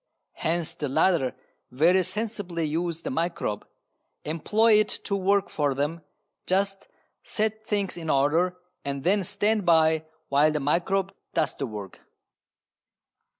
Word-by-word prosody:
Hence 165 0 -1
the 145 - -4
latter 155 -3 +2 0.3
very 165 +9 +4
sensibly 190 -3 -3
use 165 +2 -2
the - - -3
microbe, 165 -11 -2 0.6
employ 210 +8 +3
it 215 - +1
to 200 - -1
work 200 +1 +2
for 145 -3 0
them, 150 +4 -2 0.5
just 195 +1 0 0.3
set 220 0 -2
things 200 -4 -2
in 165 -2 -5
order 160 +7 +2 0.3
and 140 -1 -4
then 195 +2 +2
stand 210 +4 +1
by 160 -2 +4 0.2
while 145 +2 +4
the 150 - -1
microbe 180 +7 0 0.2
does 160 -3 +1
the 135 - -3
work. 105 -4 -8
170 Hz, 130 wpm, -26 LUFS, 150-195 Hz, 0.6 s, very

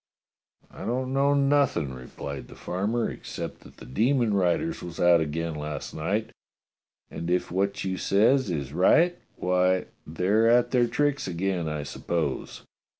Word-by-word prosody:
*'I - - -9
don't 130 +2 -1
know 140 +1 +3
nothing," 140 - +2
replied 65 +1 -7
the - - -13
farmer, 105 +6 -1
"except - - -6
that - - -17
the - - -11
demon 115 - +1
riders 100 - +1
was 85 -1 -8
out 85 -1 +5
again 80 +2 -2
last 75 0 -5
night, 100 +8 -2 0.8
and 85 +1 -5
if 90 -1 0
what 100 +2 -1
you 95 -1 -2
says 110 +6 +3
is 70 -5 -3
right, 165 - +4 0.2
why, 90 0 +1 0.2
they're 95 +8 +2
at 120 +1 +4
their 125 -2 +3
tricks 145 +2 0
again, 90 -2 -1
I 75 -1 -3
suppose. 75 0 -3
95 Hz, 150 wpm, -26 LUFS, 80-120 Hz, 0.8 s, out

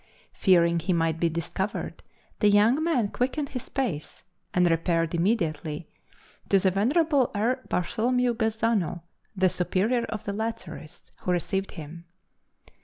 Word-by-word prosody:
Fearing 170 -3 +4
he 175 +3 0
might 165 -1 +1
be 170 - +2
discovered, 170 +5 -3 0.4
the 210 - +5
young 220 +9 +4
man 255 -11 +1
quickened 270 +5 -1
his 255 -3 -6
pace, 220 - -3 0.3
and 180 0 +3
repaired 165 0 +1
immediately 165 -5 -1 0.6
to 200 - +5
the 190 0 +2
venerable 275 - +2
R. 235 +6 +1
Bartholomew 240 +6 +1
Gazzano, 220 -6 0 0.3
then 185 -1 +3
Superior 215 +7 +1
of 220 -1 -5
the 200 - -3
Lazarists, 205 -8 -6
who 180 - -2
received 190 +2 -1
him. 165 +1 -9
195 Hz, 130 wpm, -26 LUFS, 170-235 Hz, 0.6 s, the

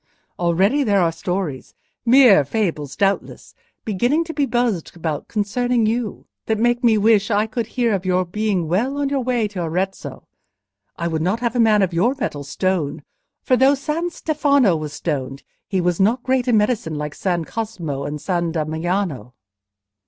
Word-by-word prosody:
Already 190 - +2
there 205 -5 +2
are 170 -2 +2
stories—mere 190 - +2
fables 150 -4 -2
doubtless—beginning 215 - -2
to 325 -1 -7
be 285 -3 0
buzzed 240 -11 -1
about 160 -3 -4
concerning 230 +3 0
you, 225 0 -2 0.2
that 220 - +1
make 240 +2 +1
me 225 -2 +4
wish 210 0 +3
I 210 0 +2
could 225 0 -3
hear 235 -3 +2
of 190 -2 -1
your 185 0 +1
being 195 -2 -1
well 235 - 0
on 285 -1 0
your 280 -1 0
way 245 -3 0
to 195 -3 -5
Arezzo. 185 +4 -4 0.7
I 170 - -2
would 160 -2 -2
not 190 +7 0
have 235 -1 -1
a - - +1
man 215 -3 +4
of 185 -2 -1
your 230 +11 +2
metal 145 - -4
stoned, 170 +1 -2 0.4
for 255 - +3
though 265 +3 +4
San 305 +5 -2
Stefano 285 - +2
was 155 -2 -5
stoned, 135 -4 -4 0.2
he 190 - -1
was 175 -1 0
not 230 +6 +2
great 260 -1 0
in 235 -3 +4
medicine 210 -7 0
like 150 0 -4
San 175 -4 -1
Cosmo 175 -12 -4
and 150 +1 -4
San 170 0 -1
Damiano..." 160 -3 -2
200 Hz, 165 wpm, -21 LUFS, 170-240 Hz, 0.7 s, me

